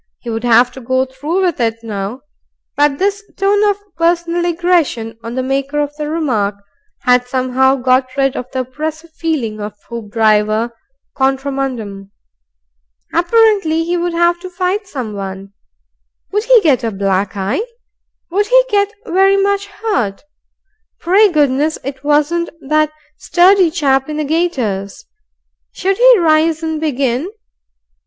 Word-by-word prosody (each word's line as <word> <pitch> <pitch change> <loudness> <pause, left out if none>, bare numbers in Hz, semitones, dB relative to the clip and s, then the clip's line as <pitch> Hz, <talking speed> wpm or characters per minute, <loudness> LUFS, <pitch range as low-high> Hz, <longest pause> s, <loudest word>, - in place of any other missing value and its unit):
He 235 - -7
would 225 +1 -3
have 240 +1 +4
to 265 - -11
go 260 +2 0
through 295 +8 -2
with 350 -6 0
it 230 -1 -1
now. 210 +3 -5 0.5
But 290 -1 +2
this 400 +3 -1
tone 405 +1 +2
of 405 - 0 0.2
personal 340 +1 +1
aggression 335 -10 0
on 230 +1 -6
the 260 - -1
maker 275 +2 -1
of 295 0 -2
the 300 0 -4
remark 245 -11 -1 0.5
had 250 -1 +3
somehow 260 +1 +2
got 255 +1 +1
rid 270 -1 +1
of 250 - -4
the 260 - -1
oppressive 310 +5 -6
feeling 280 -11 -3
of 210 0 -6 0.2
Hoopdriver 215 0 +1 0.4
contra 270 +1 0
mundum. 225 -8 -4 1.0
Apparently, 350 -3 +3
he 345 +2 -1
would 350 0 -1
have 345 +1 +2
to 370 +1 -8
fight 370 +3 -2
someone. 200 - -6 0.8
Would 420 +3 -1
he - - +6
get 285 -8 +2
a 230 - 0
black 195 0 -1
eye? 200 - -1 0.7
Would 410 +3 +1
he - - +5
get 405 -2 +1
very 390 0 +3
much 400 0 0
hurt? 400 - -2 0.8
Pray 390 +4 +4
goodness 295 0 +1
it 265 0 -6
wasn't 300 +4 +1 0.2
that 305 +1 +2 0.3
sturdy 370 0 +4
chap 275 -5 +1
in 300 - -4
the 305 - -1
gaiters! 255 - -2 0.7
Should 385 +1 -1
he - - +7
rise 320 -1 +2
and 320 -1 -2
begin? 275 0 -1
290 Hz, 145 wpm, -16 LUFS, 245-345 Hz, 1.0 s, he